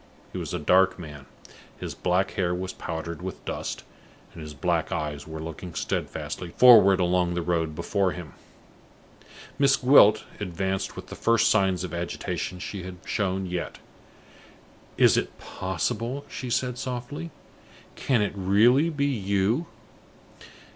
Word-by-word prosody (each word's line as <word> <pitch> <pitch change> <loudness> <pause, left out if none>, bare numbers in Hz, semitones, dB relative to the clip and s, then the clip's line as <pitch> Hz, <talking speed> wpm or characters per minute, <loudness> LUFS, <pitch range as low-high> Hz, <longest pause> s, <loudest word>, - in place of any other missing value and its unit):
He - - -5
was - - -5
a 90 - -1
dark 95 +4 +3
man, 75 -6 -10 0.5
his - - -5
black 90 +2 0
hair 90 -2 0
was 95 +1 -4
powdered 85 0 -5
with 95 +1 -7
dust, - - -4 0.5
and 85 - -10
his 75 -1 -8
black - - 0
eyes 75 -1 -3
were 80 0 -7
looking 80 +2 -7
steadfastly 90 - -3
forward 110 -7 +8
along 90 -1 +1
the 85 - -1
road 80 -3 -1
before 100 +3 0
him. 85 -6 -8 1.3
Miss 135 -1 +5
Gwilt 125 -5 +6 0.2
advanced 95 0 -3
with - - -9
the - - -7
first 115 0 +3
signs 95 -4 +2
of 90 -3 -6
agitation 85 +1 -4
she 95 +2 -6
had 90 0 -8
shown 95 -2 -1
yet. 90 -1 -4 1.2
"Is - - +5
it - - -2
possible?" 115 - -3
she 130 -2 -6
said, 125 0 -1
softly. 130 +7 -5 0.7
"Can 120 -6 +1
it 100 - -2
really 110 - +4
be 145 -3 -1
you?" 105 - 0
95 Hz, 140 wpm, -26 LUFS, 85-115 Hz, 1.3 s, forward